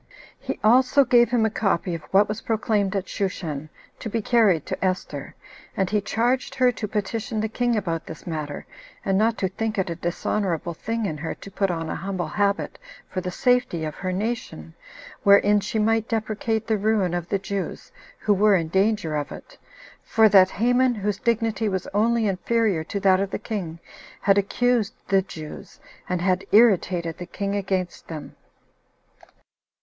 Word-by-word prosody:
He - - -5
also 255 +5 +5
gave 240 -1 +5
him 235 -2 +2
a 220 - 0
copy 195 -5 0
of 165 - -4
what 195 +6 +4
was 210 +1 -4
proclaimed 210 -3 0
at 195 -1 -2
Shushan, 160 -7 -3 0.3
to 225 - -5
be 230 - -1
carried 210 - +3
to - - -4
Esther; 180 -7 -3 0.4
and 190 -1 0
he 210 -1 +2
charged 240 +5 0
her 255 -1 +4
to 220 -3 -5
petition 220 +2 -3
the 220 - 0
king 240 +2 0
about 170 -6 -2
this 160 - -9
matter, 155 -4 -5 0.4
and 195 - +1
not 225 +3 +2
to 190 - 0
think 220 +3 -3
it 190 -2 0
a - - -3
dishonorable 175 0 -2
thing 225 +6 -3
in 155 -6 -3
her 160 - -4
to 200 - -12
put 195 0 0
on 165 -2 -2
a - - -3
humble 185 -4 -3
habit, 200 +3 -1 0.3
for 185 - -2
the 180 - -3
safety 245 -6 +1
of 155 - -4
her 185 +3 -4
nation, 185 - -4 0.5
wherein 200 +1 +5
she 210 +2 -3
might 225 +1 +1
deprecate 220 0 -1
the 220 -2 0
ruin 205 -4 +1
of 175 -1 -3
the 200 - +1
Jews, 195 0 -5 0.3
who 210 - +3
were 205 +1 +4
in 165 -3 0
danger 190 -3 +1
of 145 -1 -3
it; - - -11 0.5
for 220 -1 +4
that 190 -2 +7
Haman, 245 +4 +2
whose 205 -1 -2
dignity 225 -2 0
was 190 -1 -2
only 225 +2 +2
inferior 200 -2 +1
to 200 - -3
that 190 -1 +4
of 195 0 -1
the - - -3
king, 180 -8 -5 0.4
had 200 0 +4
accused 235 +2 +1
the 195 -1 +4
Jews, 155 -5 -10 0.3
and 180 -1 -1
had 185 0 +1
irritated 185 -7 +3
the 180 - -6
king 200 +2 -3
against 190 -3 -2
them. 155 -3 -8
200 Hz, 180 wpm, -24 LUFS, 180-220 Hz, 0.5 s, that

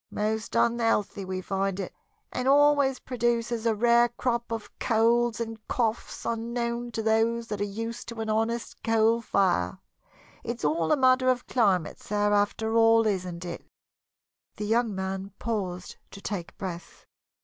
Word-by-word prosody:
Most 215 +1 -2
unhealthy 225 -4 +1
we 185 0 -4
find 195 0 -2
it, 190 - -5 0.4
and 250 +1 -2
always 285 -1 +4
produces 235 -2 -1
a 225 - +2
rare 235 +2 +4
crop 240 -1 -2
of 225 -2 -4
colds 235 0 +2
and 225 -1 -4
coughs 230 -2 -2
unknown 235 +1 -2
to 225 - -2
those 225 +1 +2
that 210 -1 -3
are - - +2
used 225 +3 -5
to 235 -1 -7
an 220 - -3
honest 225 +2 -1
coal 225 +1 +3
fire. 180 - +1 0.7
It's 235 -6 -4
all 160 +2 +1
a - - +4
matter 255 -1 +4
of 250 -1 +1
climate, 195 -10 +1
sir, 205 0 0
after 215 +2 +1
all, 225 0 +5
isn't 180 -4 -2
it?" 175 - -6 0.9
The 210 - -4
young 225 -1 +1
man 190 0 -4
paused 185 -6 -4
to 200 - -11
take 195 -4 -5
breath. 175 -3 -7
225 Hz, 150 wpm, -27 LUFS, 200-235 Hz, 0.9 s, all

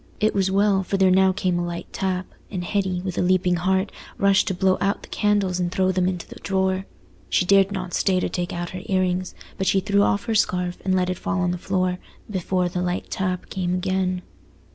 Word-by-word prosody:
It 215 +1 +2
was 195 -1 +1
well: 195 0 +3
for 195 +1 -2
there 190 -1 +4
now 190 0 +5
came 185 -2 0
a - - -1
light 175 0 -4
tap, 185 -1 -1 0.2
and 185 -3 -4
Hetty, 190 -1 -1
with 185 -2 -3
a - - +3
leaping 180 0 +2
heart, 190 +2 +1 0.3
rushed 200 -1 +3
to 190 - 0
blow 185 +1 +2
out 200 +1 0
the - - -12
candles 205 -3 +1
and 175 -1 -1
throw 185 0 +2
them 185 -1 +1
into 180 -2 -3
the - - -11
drawer. 190 0 0 0.4
She 180 - +2
dared 195 +1 +5
not 185 -3 -4
stay 185 -2 +2
to - - 0
take 175 -1 -3
out 175 0 -4
her 185 - -6
ear 190 -1 +1
rings, 185 0 -1 0.2
but 190 - 0
she 195 - +4
threw 200 +1 +2
off 200 0 +1
her 225 - -1
scarf, 180 -4 +1
and 190 -1 +1
let 185 0 +1
it 185 - -5
fall 195 -2 -1
on 180 0 +1
the 180 - -3
floor, 185 -1 0 0.3
before 185 -2 0
the 180 0 -3
light 180 0 -2
tap 185 -2 -2
came 180 -1 -1
again. 185 -1 -1
185 Hz, 230 wpm, -23 LUFS, 180-195 Hz, 0.4 s, now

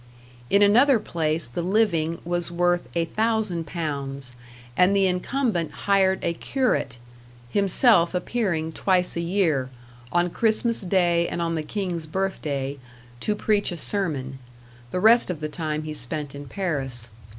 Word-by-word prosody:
In 200 +1 +5
another 245 +6 +5
place 165 - -1
the 120 +8 -4
living 170 -4 +1
was 175 0 -1
worth 175 0 0
a 165 - +2
thousand 215 -3 -1
pounds, 140 -5 -4 0.4
and 185 +6 +4
the 195 -1 +3
incumbent 185 - 0
hired 190 -1 +3
a 170 - 0
curate, 170 - -1 0.5
himself 195 - +3
appearing 180 -5 -1
twice 180 +1 +1
a 170 - -1
year, 170 -7 +1 0.4
on 175 0 +1
Christmas 225 +2 +2
day 175 -3 +2
and - - -4
on 165 -1 -1
the 160 - -1
King's 175 -1 -4
birth 190 +4 -2
day, 140 -1 -3 0.4
to 210 - -1
preach 210 -2 +1
a 175 - -5
sermon; 145 -9 -3 0.5
the 180 - -2
rest 225 +3 +5
of 175 -4 -3
the 155 - -3
time 155 -1 -3
he 155 0 -5
spent 145 +1 -1
in 140 0 -8
Paris. 135 - -3
175 Hz, 150 wpm, -24 LUFS, 155-200 Hz, 0.5 s, In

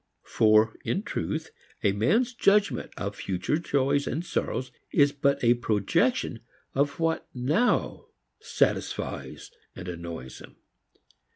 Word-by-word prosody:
For, 110 0 +4
in - - -1
truth, - - -3 0.3
a 100 - +4
man's 220 - +2
judgment 210 -2 +2
of 100 0 -4
future 95 - -1
joys 140 -2 +1
and 160 +7 -2
sorrows 130 -6 -2 0.2
is 145 -1 +4
but 140 -1 0
a 120 0 +6
projection 110 -4 0 0.3
of 140 +3 0
what 165 0 0
now 150 - +1 0.3
satisfies - - -2 0.2
and 90 -1 -8
annoys 85 -7 -7
him. - - -14
130 Hz, 115 wpm, -27 LUFS, 105-160 Hz, 0.3 s, a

